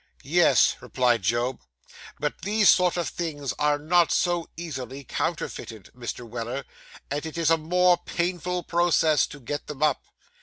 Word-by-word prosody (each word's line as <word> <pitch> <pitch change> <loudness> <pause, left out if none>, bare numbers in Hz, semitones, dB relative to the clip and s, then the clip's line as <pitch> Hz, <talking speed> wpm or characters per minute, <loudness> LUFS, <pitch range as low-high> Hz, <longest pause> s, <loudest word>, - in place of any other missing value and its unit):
'Yes,' - - +4
replied 125 -3 +1
Job; 120 +6 0 0.6
'but 150 0 -3
these 210 +1 +3
sort 180 -1 +2
of 175 - -1
things 145 -6 -4
are 150 0 +2
not 170 +3 +3
so 175 -2 +1
easily 140 -5 -6
counterfeited, 110 -3 -4
Mr. 120 -1 -6
Weller, 120 +3 -5 0.5
and 145 +1 -2
it 160 0 -6
is 165 -1 +2
a - - +7
more 180 +3 +3
painful 180 0 -2
process 165 -4 +3
to 145 - -11
get 145 +3 -5
them 150 0 -4
up. 155 - +2
150 Hz, 150 wpm, -25 LUFS, 130-175 Hz, 0.6 s, a